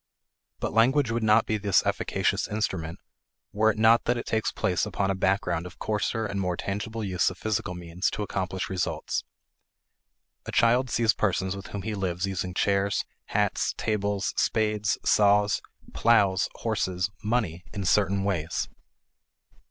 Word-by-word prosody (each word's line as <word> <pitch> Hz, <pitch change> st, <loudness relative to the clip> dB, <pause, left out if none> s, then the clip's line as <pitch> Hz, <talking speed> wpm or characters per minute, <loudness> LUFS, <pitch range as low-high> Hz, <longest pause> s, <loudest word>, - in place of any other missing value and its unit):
But -, -, -3 dB
language 125 Hz, +3 st, +3 dB
would 115 Hz, +1 st, -1 dB
not 110 Hz, +1 st, +4 dB
be 110 Hz, -1 st, -1 dB
this 100 Hz, -2 st, +2 dB
efficacious -, -, 0 dB
instrument 95 Hz, -6 st, -2 dB, 0.6 s
were 110 Hz, +2 st, +3 dB
it 110 Hz, -, -1 dB
not 115 Hz, +1 st, +5 dB
that 120 Hz, +1 st, +1 dB
it 120 Hz, -, -4 dB
takes 110 Hz, 0 st, 0 dB
place 90 Hz, -1 st, 0 dB
upon 95 Hz, -1 st, -1 dB
a -, -, +1 dB
background 90 Hz, -3 st, 0 dB
of -, -, -13 dB
coarser 110 Hz, +1 st, -1 dB
and 100 Hz, -1 st, -2 dB
more 90 Hz, -2 st, -1 dB
tangible 110 Hz, +3 st, -4 dB
use 95 Hz, -3 st, +1 dB
of 95 Hz, -, -9 dB
physical 100 Hz, -4 st, -2 dB
means 90 Hz, +1 st, -2 dB
to 105 Hz, -, -3 dB
accomplish 95 Hz, -2 st, -3 dB
results. 95 Hz, -2 st, -2 dB, 1.2 s
A -, -, -3 dB
child 125 Hz, +2 st, +3 dB
sees 115 Hz, -2 st, +3 dB
persons 95 Hz, -2 st, 0 dB
with 100 Hz, -, -8 dB
whom 100 Hz, -2 st, -6 dB
he 110 Hz, -, -3 dB
lives 95 Hz, -2 st, -1 dB
using 90 Hz, -2 st, -3 dB
chairs, 100 Hz, 0 st, +1 dB, 0.2 s
hats, -, -, 0 dB
tables, 100 Hz, -2 st, -1 dB
spades, 105 Hz, -1 st, +1 dB
saws, 105 Hz, 0 st, +4 dB, 0.3 s
plows, 100 Hz, -5 st, +3 dB
horses, 100 Hz, -4 st, -1 dB
money 105 Hz, -7 st, -1 dB
in 100 Hz, -2 st, -4 dB
certain 100 Hz, 0 st, +2 dB
ways. 85 Hz, -5 st, -1 dB
100 Hz, 150 wpm, -27 LUFS, 95-110 Hz, 1.2 s, not